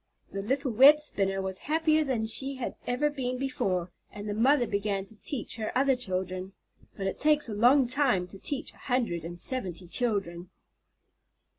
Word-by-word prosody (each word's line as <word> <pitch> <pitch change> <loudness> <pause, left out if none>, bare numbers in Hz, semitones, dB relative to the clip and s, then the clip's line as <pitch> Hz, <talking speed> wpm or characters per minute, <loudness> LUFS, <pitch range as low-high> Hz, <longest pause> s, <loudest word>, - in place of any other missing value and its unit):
The 195 - -4
little 265 +5 -1
web 275 +7 +8
spinner 195 -9 0
was 190 0 -4
happier 315 0 +3
than 250 -6 -1
she 270 +5 -2
had 260 - -4
ever 250 +4 +1
been 255 -3 -3
before, 185 -9 -2 0.2
and 210 0 -8
the 205 - -2
mother 250 +4 +3
began 200 -2 -2
to 220 - -11
teach 250 -4 -5
her 220 -1 -3
other 270 0 +3
children. 185 -4 -3 0.4
But 195 - -4
it 195 - -3
takes 300 -1 +3
a 220 - -5
long 250 +6 +5
time 245 -7 +1
to 195 - -11
teach 285 +6 -3
a - - -22
hundred 235 - -1
and 170 +1 -7
seventy 185 -7 -2
children. 185 -5 -1
230 Hz, 175 wpm, -28 LUFS, 195-270 Hz, 0.4 s, web